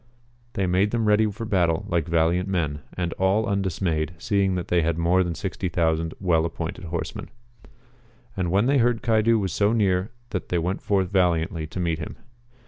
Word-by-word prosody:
They 95 - 0
made 95 +3 +2
them 115 0 0
ready 105 +1 +4
for 110 +3 -6
battle 85 -6 +1
like 85 -2 0
valiant 85 +3 +1
men, 80 -6 -1 0.2
and 85 -2 -1
all 95 +4 +2
undismayed, 90 -6 -1
seeing 100 -2 +1
that 90 -2 -4
they 90 -1 +3
had 80 0 0
more 85 +2 +3
than 85 -2 -3
60,000 80 -1 -1
well 85 -4 +2
appointed 85 +1 -4
horsemen. 85 0 -5 1.1
And 90 -3 -1
when 100 +5 +2
they 140 +1 +3
heard 120 -1 +1
Caidu 115 0 +3
was 95 -6 -2
so 105 +2 +2
near 95 -3 +1 0.2
they 90 -2 -2
went 90 +3 -1
forth 95 -2 0
valiantly 85 -3 +1
to 85 - -7
meet 85 -2 -1
him. - - -6
90 Hz, 175 wpm, -24 LUFS, 85-100 Hz, 1.1 s, ready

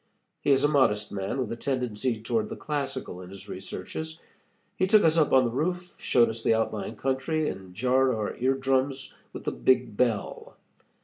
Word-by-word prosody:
He - - -1
is 135 0 +4
a - - +6
modest 115 -8 +2
man, 100 +4 -3
with 125 -5 -2
a - - -2
tendency 125 -2 -1
toward 115 -2 0
the - - -5
classical 135 -10 -4
in 90 - -10
his 95 0 -11
researches. 160 +1 -6 0.6
He 185 - +1
took 210 +1 +6
us 160 -1 +4
up 155 -3 +3
on 130 -1 +5
the 120 - -1
roof, 180 +7 -2
showed 120 -2 +4
us 115 +1 -4
the 115 - +3
outlying 110 0 -2
country, 135 +6 -1
and 95 -1 -6
jarred 130 +4 +3
our 110 -4 -2
ear 130 +2 +2
drums 135 0 -1 0.2
with - - -8
the - - -1
big 125 -4 +2
bell. 115 -3 -1
130 Hz, 190 wpm, -27 LUFS, 110-140 Hz, 0.6 s, a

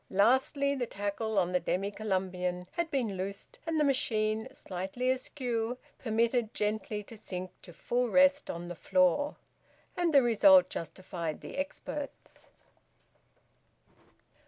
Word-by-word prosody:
Lastly, 260 +7 +3
the 255 -4 -2
tackle 205 +2 -3
on 180 -2 +2
the 180 - +2
Demy 195 +3 -1
Columbian 185 -3 -2
had 340 -1 -2
been 235 -9 -1
loosed, 195 +2 -6
and 325 -1 +1
the - - +4
machine, 220 -5 +1
slightly 195 +2 -2
askew, 245 -2 -2 0.2
permitted 230 0 +1
gently 210 0 -1
to 225 - -11
sink 185 -4 -5
to 175 - -11
full 240 +8 -1
rest 280 +3 +4
on 170 +1 -5
the 175 - -5
floor: 185 - +2 0.6
and 350 -2 +1
the 280 -3 +6
result 275 +4 +6
justified 170 -1 -5
the - - -8
experts. 285 0 -6
220 Hz, 130 wpm, -31 LUFS, 190-265 Hz, 0.6 s, the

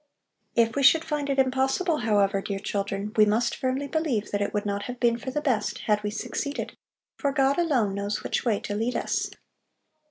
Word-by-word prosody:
If 230 -1 +3
we 280 - +1
should 320 +4 +6
find 295 -2 -2
it 275 - 0
impossible, 265 +6 +2
however, 205 -4 +2
dear 200 0 -3
children, 200 +1 -3
we 215 - +6
must 220 +3 +2
firmly 260 +1 -1
believe 280 -9 -1
that 205 - -1
it 200 - 0
would 205 0 -2
not 200 0 -2
have 250 -1 -6
been 235 -1 +2
for 260 - -5
the 295 +3 -2
best, 245 -8 0
had 210 -1 +1
we 210 - -1
succeeded, 280 +6 -4 0.4
for 280 - 0
God 275 +1 +2
alone 255 - +2
knows 200 +1 -3
which - - -1
way 225 -5 +1
to 205 - -4
lead 225 +4 -1
us. - - -1
235 Hz, 200 wpm, -26 LUFS, 205-275 Hz, 0.4 s, should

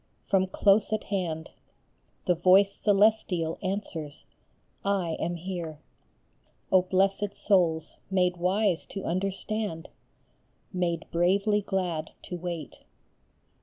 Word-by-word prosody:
from 190 -1 +3
close 200 +3 +3
at 215 - 0
hand, 170 -5 -3 0.7
The 180 - +4
voice 190 +3 +5
Celestial 200 -5 +2
answers, 185 -7 -4 0.3
" - - -41 0.2
I 165 - -3
am 175 - -1
here! 170 -3 -5 0.5
" - - -40
Oh, 185 - +6
blessed 195 +2 +1
souls, 170 -6 +1
made 180 -2 +2
wise 185 0 +1
to 195 - -6
understand, 195 0 -2 0.8
Made 175 -2 -1
bravely 200 +5 +2
glad 180 -5 -2
to 180 - -6
wait 170 -4 -5
185 Hz, 110 wpm, -28 LUFS, 170-200 Hz, 0.8 s, Oh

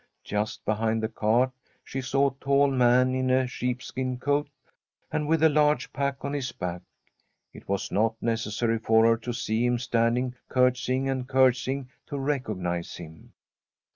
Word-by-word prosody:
Just 105 +1 -3
behind 110 +1 0
the - - +1
cart 115 +3 +1 0.3
she 135 - -5
saw 135 +1 +2
a 135 - -26
tall 140 0 +3
man 125 0 +4
in 130 0 0
a 130 0 +3
sheepskin 125 +1 -3
coat, 145 +3 0 0.6
and 150 -1 -1
with 160 0 +2
a - - +8
large 150 0 +2
pack 140 -1 -2
on 140 - -3
his 135 -3 -2
back. 90 -1 -5 0.7
It - - -14
was 100 -1 -2
not 110 +2 +1
necessary 115 0 -1
for 110 0 +4
her 115 0 +4
to 120 +2 -5
see 115 -1 -1
him 120 0 +2
standing 120 +1 0 0.2
curtsying 130 +1 +1
and 130 -2 -2
curtsying 130 0 +2 0.2
to - - -5
recog 135 -6 -2
nise 90 -1 -3
him. 80 -2 -12
125 Hz, 165 wpm, -27 LUFS, 115-135 Hz, 0.7 s, a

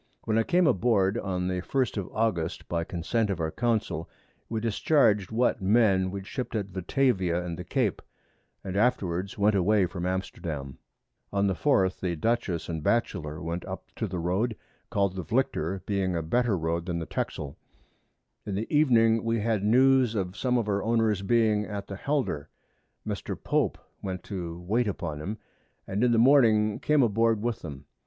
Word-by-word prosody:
When 110 - 0
I - - +5
came 175 +9 +2
aboard, 105 - +3
on 90 -3 -2
the 90 -1 -1
1st 130 +5 -1
of 100 -4 -3
August, 100 -7 -1
by 85 -1 -1
Consent 95 +7 -1
of 95 -3 -2
our 80 -1 -1
Council, 110 -9 -1 0.4
we 115 - -1
discharg'd 110 - +2
what 120 0 +1
Men 95 -2 +3
we 100 0 -5
ship't 125 +5 -5
at 100 -3 -3
Batavia 95 - +1
and 85 -1 -4
the 90 - -6
Cape, 110 +2 0 0.6
and 95 -1 -5
afterwards 100 -5 0
went 105 +1 +3
away 100 +1 +3
from 90 0 -4
Amsterdam. 85 -7 -4 0.5
On 100 0 +1
the 95 - +2
4th 95 -6 +2
the 90 -2 -1
Dutchess 110 -2 -1
and 80 -2 -3
Batchelor 80 -7 -1
went 85 +2 -3
up 95 0 -8
to 110 - -1
the 90 -1 -4
Road, 95 +7 0 0.3
call'd 100 -2 0
the 95 - -4
Vlicter, 95 -6 -1
being 95 -3 0
a 85 - -1
better 120 +4 +1
Road 85 +1 -2
than 85 -2 -1
the 85 - -3
Texel. 70 -3 -4 0.8
In 100 - -4
the 105 +3 -1
Evening 115 -6 +4
we 115 -1 0
had 110 -2 0
News 130 +1 +4
of 95 -2 -2
some 125 +1 +1
of 115 -3 -1
our 100 -1 0
Owners 110 -3 +1
being 110 0 +2
at 100 -2 -5
the 100 - -7
Helder: 110 - -2 0.6
Mr. - - -4
Pope - - 0 0.2
went 95 -2 -4
to 85 -4 -5
wait 110 +7 0
upon 80 -6 -4
'em, 105 +7 -4 0.5
and 100 +4 -1
in 125 - +4
the 115 - +3
Morning 115 -5 +5
came 150 -3 +3
aboard 115 -1 +2
with 120 -1 -1
them. 70 -3 -8
100 Hz, 175 wpm, -27 LUFS, 90-115 Hz, 0.8 s, I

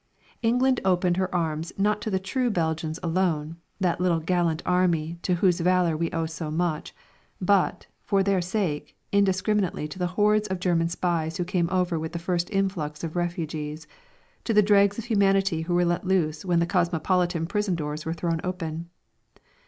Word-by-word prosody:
England 250 +2 +2
opened 180 -1 +2
her 185 -1 0
arms 160 -1 -1
not 210 +1 +1
to 220 - -3
the 190 - +1
true 240 +7 -1
Belgians 160 -3 -1
alone, 165 -2 0 0.2
that 180 -2 0
little 175 -2 +2
gallant 165 -1 0
army 170 -2 +1
to 180 - +1
whose 180 0 +2
valour 180 -1 +2
we 165 +1 -1
owe 165 -1 -1
so 160 -1 -5
much, 160 0 -2 0.4
but, 195 0 +2 0.2
for 195 -2 +1
their 195 -2 +2
sake, 175 -5 -2
indiscriminately 195 -3 +1
to 150 +5 -9
the 180 - +1
hordes 210 0 +3
of 190 -2 -3
German 170 -2 +1
spies 165 -2 -1
who 180 - 0
came 175 -1 0
over 180 -3 0
with 160 +1 -5
the - - -2
first 175 0 -1
influx 185 -7 -2
of 165 0 -4
refugees, 160 -3 -3 0.6
to 225 - -1
the 210 - +6
dregs 200 0 +4
of 230 - -5
humanity 195 -6 +2
who 175 +2 -1
were 175 0 +3
let 175 +1 0
loose 170 -5 0
when 180 -2 +1
the 170 - +2
cosmopolitan 175 -1 +1
prison 205 +1 -1
doors 150 -1 -4
were 160 - -3
thrown 165 -1 -1
open. 170 -2 -4
175 Hz, 175 wpm, -26 LUFS, 165-190 Hz, 0.6 s, the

